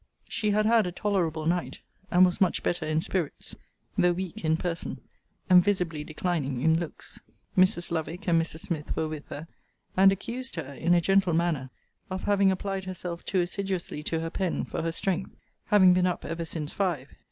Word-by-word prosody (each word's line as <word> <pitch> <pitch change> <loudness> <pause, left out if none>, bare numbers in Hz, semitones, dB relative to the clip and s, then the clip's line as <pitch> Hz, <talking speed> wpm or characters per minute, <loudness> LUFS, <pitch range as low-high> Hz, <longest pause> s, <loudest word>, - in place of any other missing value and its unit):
She 210 - -1
had 210 +1 +2
had 225 -3 +4
a - - -3
tolerable 170 -6 -1
night, 175 +2 0 0.3
and 180 +1 +6
was 180 +1 -1
much 185 - +2
better 170 -3 -1
in 155 +1 +1
spirits; 170 -4 -3 0.4
though 180 0 +4
weak 180 -1 -5
in 160 0 +2
person; 170 -1 -3 0.5
and 180 -2 +7
visibly 175 -6 0
declining 155 -5 -2
in 160 +2 +4
looks. 170 -3 -6 0.4
Mrs. 185 -2 +3
Lovick 165 +2 -3
and 165 -2 +4
Mrs. 160 -1 -5
Smith 160 -5 -3
were 160 - 0
with 155 -1 -7
her; 150 +3 -7 0.5
and 195 +1 +7
accused 240 +7 -4
her, 140 - -5
in 170 +6 +2
a 175 - +4
gentle 195 0 +3
manner, 160 -6 0 0.4
of 185 0 -4
having 200 -1 +4
applied 190 0 -3
herself 180 -2 -5
too 190 -2 +1
assiduously 185 -3 -2
to 160 +1 -2
her 165 0 -3
pen 185 -2 -1
for - - -4
her 165 0 -1
strength, 190 +2 -2 0.3
having 190 -3 +6
been 180 0 +3
up 180 - -2
ever 165 0 -3
since 160 -2 -5
five. 170 -9 -1
175 Hz, 185 wpm, -28 LUFS, 160-190 Hz, 0.5 s, and